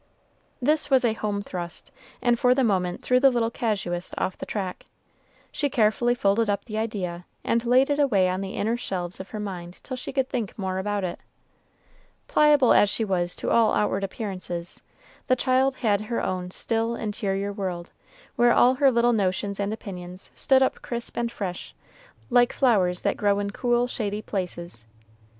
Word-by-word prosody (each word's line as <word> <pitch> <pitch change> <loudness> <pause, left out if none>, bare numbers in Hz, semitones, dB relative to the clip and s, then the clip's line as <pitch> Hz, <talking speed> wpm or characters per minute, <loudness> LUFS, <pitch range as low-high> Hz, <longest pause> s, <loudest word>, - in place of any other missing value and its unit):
This 295 +3 +2
was 265 -2 +4
a 225 - +2
home 205 -2 -3
thrust, 175 -3 -6 0.3
and 240 -1 +3
for 250 0 +4
the 265 - +2
moment 185 -5 0
threw 250 0 +3
the 270 +1 +6
little 235 -2 0
casuist 195 -7 -2
off 185 - -1
the - - -8
track. 190 -4 -4 0.6
She 290 - -1
carefully 240 -1 +2
folded 210 0 +2
up 200 0 -1
the 215 - -7
idea, 180 -6 -3 0.2
and 230 0 +1
laid 255 +4 +4
it 285 - +1
away 210 -10 +3
on 185 +1 -1
the 195 0 -5
inner 225 +3 0
shelves 180 -6 -4
of 190 - -8
her 215 - -6
mind 180 -4 -6
till 260 - -5
she 255 - -6
could 265 -2 0
think 230 -7 -4
more 190 -2 -2
about 205 0 -2
it. 180 - -3 1.1
Pliable 295 -4 +5
as 205 - +5
she 225 - -1
was 175 -3 0
to - - -2
all 230 -2 +4
outward 200 -1 0
appearances, 185 -4 -5 0.5
the 255 - +4
child 260 +1 +2
had 210 -5 +1
her 225 +2 -2
own 180 -1 -2
still, 225 +4 -1
interior 200 -2 -2
world, 185 -3 -4 0.5
where 240 0 +5
all 250 +1 +5
her 275 +1 +4
little 240 -1 +3
notions 200 -1 -1
and 200 +1 -1
opinions 185 -4 -7
stood 265 -1 +3
up - - -1
crisp 235 0 -5
and 235 0 -1
fresh, 185 -6 -6 0.6
like 245 0 +5
flowers 190 -9 +2
that - - 0
grow 205 -1 +2
in 200 0 -2
cool, 240 +2 +1
shady 210 -3 -3
places. 175 - -5
210 Hz, 180 wpm, -25 LUFS, 190-240 Hz, 1.1 s, the